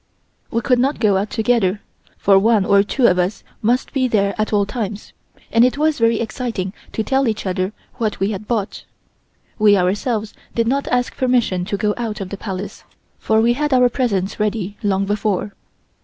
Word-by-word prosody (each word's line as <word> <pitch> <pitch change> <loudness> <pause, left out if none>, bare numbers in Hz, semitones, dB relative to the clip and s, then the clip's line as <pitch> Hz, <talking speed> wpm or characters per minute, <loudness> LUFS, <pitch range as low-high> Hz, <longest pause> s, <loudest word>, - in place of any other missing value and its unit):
We 230 - -1
could 250 -1 +2
not 275 +4 +1
go 210 -4 +3
out 200 +2 -1
together, 220 -4 +1 0.4
for 195 -1 +4
one 215 -1 +3
or 200 0 +5
two 235 +5 0
of 180 -4 +4
us 180 +4 -1 0.2
must 240 +4 0
be 265 -3 +1
there 200 -4 +1
at 215 0 -1
all 205 -2 +2
times, 210 -1 -5 0.4
and 230 +1 +5
it 255 +3 +2
was 305 -1 +1
very 230 -1 +3
exciting 225 -4 -3 0.2
to 220 - -1
tell 270 +2 +1
each 220 -2 -2
other 185 +1 -1 0.3
what 215 -3 -2
we 195 +2 0
had 210 +1 -6
bought. 215 -5 -2 0.8
We 210 -1 +5
ourselves 210 +4 -1 0.2
did 230 -1 +1
not 275 +3 0
ask 245 0 0
permission 240 -8 +1
to 200 +1 -2
go 210 +1 0
out 225 -3 -3
of 195 -2 -5
the 200 - -5
Palace, 195 -1 -6 0.4
for 220 0 +2
we 235 +1 +3
had 295 +2 -1
our 250 -1 +5
presents 210 -8 -1
ready 210 -2 -1
long 195 -1 +1
before. 205 -1 -1
215 Hz, 190 wpm, -19 LUFS, 200-240 Hz, 0.8 s, or